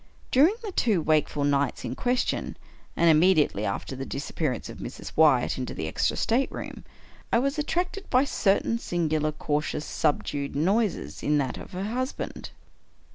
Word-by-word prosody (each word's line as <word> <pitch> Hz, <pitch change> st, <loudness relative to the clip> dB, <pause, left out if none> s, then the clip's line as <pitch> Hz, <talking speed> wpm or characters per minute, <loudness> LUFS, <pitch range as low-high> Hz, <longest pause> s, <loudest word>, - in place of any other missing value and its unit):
During 310 Hz, +11 st, +5 dB
the 420 Hz, -, -4 dB
two 220 Hz, -, +2 dB
wakeful 155 Hz, -2 st, +1 dB
nights 140 Hz, -2 st, +1 dB
in -, -, -3 dB
question, 245 Hz, -, -1 dB, 0.4 s
and 170 Hz, -, +4 dB
immediately 155 Hz, -, +4 dB
after 100 Hz, +6 st, -3 dB
the 135 Hz, -, -5 dB
disappearance 135 Hz, -1 st, -3 dB
of -, -, -9 dB
Mrs. -, -, -7 dB
Wyatt 140 Hz, -6 st, +4 dB
into 125 Hz, -, -4 dB
the 80 Hz, -, -3 dB
extra -, -, 0 dB
stateroom, 255 Hz, +4 st, -1 dB, 0.5 s
I -, -, +4 dB
was 275 Hz, +5 st, 0 dB
attracted 355 Hz, +6 st, -2 dB
by 255 Hz, +1 st, +4 dB
certain 230 Hz, -3 st, +1 dB
singular, 155 Hz, -6 st, 0 dB
cau 150 Hz, 0 st, -1 dB
tious, 150 Hz, 0 st, -4 dB
subdued 145 Hz, -3 st, -1 dB
noises 195 Hz, +6 st, 0 dB
in 150 Hz, 0 st, +2 dB
that 135 Hz, -3 st, -1 dB
of -, -, -11 dB
her 185 Hz, +1 st, -3 dB
husband. 255 Hz, +6 st, -4 dB
160 Hz, 155 wpm, -26 LUFS, 145-235 Hz, 0.5 s, During